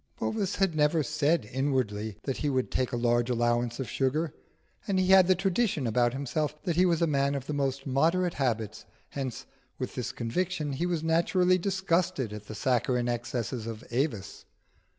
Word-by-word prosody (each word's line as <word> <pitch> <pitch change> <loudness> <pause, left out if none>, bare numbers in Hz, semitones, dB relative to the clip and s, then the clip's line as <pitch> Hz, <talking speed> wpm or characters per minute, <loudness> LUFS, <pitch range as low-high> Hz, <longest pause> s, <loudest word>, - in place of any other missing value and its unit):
Bovis 205 -3 -1
had 195 -4 +1
never 150 +1 +3
said 150 0 +1
inwardly 115 -7 -1
that 135 - -2
he 150 - -1
would 130 -2 0
take 130 -1 0
a - - -1
large 120 0 +2
allowance 120 0 0
of 135 - -3
sugar, 150 +4 0 0.5
and 195 -2 +1
he 185 0 +2
had 190 -2 +8
the 185 - +5
tradition 185 - 0
about 120 +1 +2
himself 145 +3 -2
that 175 -4 -1
he 180 +2 +4
was 170 -1 +2
a - - +5
man 140 -2 +1
of 135 -2 -4
the 150 - -3
most 135 -1 -1
moderate 165 +6 +2
habits; 110 -5 -2 0.2
hence, 135 -4 -5 0.3
with 130 - -4
this 125 - -3
conviction, 150 +5 -2
he 170 +6 -1
was 170 -3 -1
naturally 180 +3 +3
disgusted 185 - 0
at 105 -1 -9
the 110 - -7
saccharine 125 +2 +1
excesses 120 -1 -3
of 115 0 -6
Avis. 120 -6 -2
140 Hz, 180 wpm, -28 LUFS, 120-170 Hz, 0.5 s, had